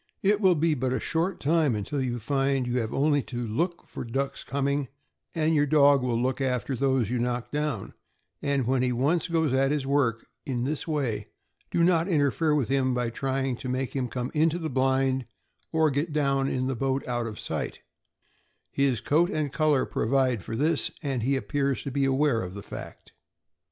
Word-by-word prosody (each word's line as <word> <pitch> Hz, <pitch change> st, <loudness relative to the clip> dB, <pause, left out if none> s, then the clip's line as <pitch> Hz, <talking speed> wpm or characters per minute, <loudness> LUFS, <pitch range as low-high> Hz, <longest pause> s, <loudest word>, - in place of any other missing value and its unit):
It 205 Hz, +2 st, +3 dB
will 185 Hz, -3 st, +5 dB
be 160 Hz, +1 st, +2 dB
but 130 Hz, -2 st, -1 dB
a -, -, 0 dB
short 170 Hz, +3 st, -1 dB
time 150 Hz, -4 st, +2 dB
until 120 Hz, +7 st, -2 dB
you 125 Hz, -2 st, -1 dB
will 120 Hz, -, -4 dB
find 135 Hz, +2 st, 0 dB
you 120 Hz, -, -2 dB
will 115 Hz, -3 st, -1 dB
only 145 Hz, +1 st, +3 dB
have -, -, -5 dB
to 120 Hz, -2 st, -4 dB
look 170 Hz, +11 st, -2 dB
for -, -, -7 dB
the 120 Hz, -, -9 dB
ducks 135 Hz, +3 st, -2 dB
coming, 140 Hz, 0 st, -1 dB, 0.5 s
and 160 Hz, 0 st, +2 dB
your 145 Hz, -1 st, +3 dB
dog 140 Hz, -2 st, +5 dB
will 120 Hz, -2 st, 0 dB
look 130 Hz, +3 st, -1 dB
after 130 Hz, 0 st, -1 dB
those 130 Hz, -3 st, +1 dB
you 125 Hz, -, 0 dB
knock 120 Hz, 0 st, -2 dB
down; 150 Hz, -9 st, -2 dB, 0.5 s
and 140 Hz, -3 st, 0 dB
when 130 Hz, +1 st, +1 dB
he 125 Hz, 0 st, +1 dB
once 145 Hz, +9 st, +1 dB
goes 160 Hz, -5 st, +1 dB
at 135 Hz, +1 st, +3 dB
his 145 Hz, -2 st, 0 dB
work 130 Hz, -5 st, +1 dB, 0.2 s
in 125 Hz, -5 st, -2 dB
this 150 Hz, +5 st, -3 dB
way, 140 Hz, -8 st, -1 dB, 0.4 s
do 170 Hz, -, +2 dB
not 170 Hz, -1 st, +3 dB
interfere 150 Hz, -2 st, +2 dB
with 140 Hz, -6 st, +1 dB
him 130 Hz, -2 st, +1 dB
by 120 Hz, -1 st, -1 dB
trying 135 Hz, +1 st, -1 dB
to 130 Hz, -, -6 dB
make 130 Hz, +1 st, -2 dB
him 130 Hz, -2 st, 0 dB
come 125 Hz, +1 st, -4 dB
into 160 Hz, +2 st, +2 dB
the 160 Hz, -4 st, -4 dB
blind, 130 Hz, 0 st, +1 dB, 0.4 s
or 160 Hz, -2 st, +3 dB
get 145 Hz, +4 st, -1 dB
down 140 Hz, -2 st, +1 dB
in 130 Hz, 0 st, -1 dB
the 130 Hz, 0 st, -1 dB
boat 135 Hz, +3 st, -1 dB
out 120 Hz, -1 st, -1 dB
of 105 Hz, -1 st, -7 dB
sight; -, -, -4 dB, 0.9 s
his 135 Hz, -5 st, +1 dB
coat 165 Hz, +4 st, +2 dB
and 150 Hz, -3 st, -2 dB
color 155 Hz, -4 st, +2 dB
provide 125 Hz, -3 st, +1 dB
for 115 Hz, -, -5 dB
this, 150 Hz, +5 st, +1 dB
and 135 Hz, -4 st, -1 dB
he 135 Hz, +5 st, +1 dB
appears 140 Hz, 0 st, -1 dB
to 140 Hz, -, -4 dB
be 140 Hz, +1 st, +1 dB
aware 135 Hz, -3 st, +2 dB
of 90 Hz, -1 st, -6 dB
the 100 Hz, -, -7 dB
fact. -, -, -9 dB
135 Hz, 205 wpm, -27 LUFS, 125-150 Hz, 0.9 s, will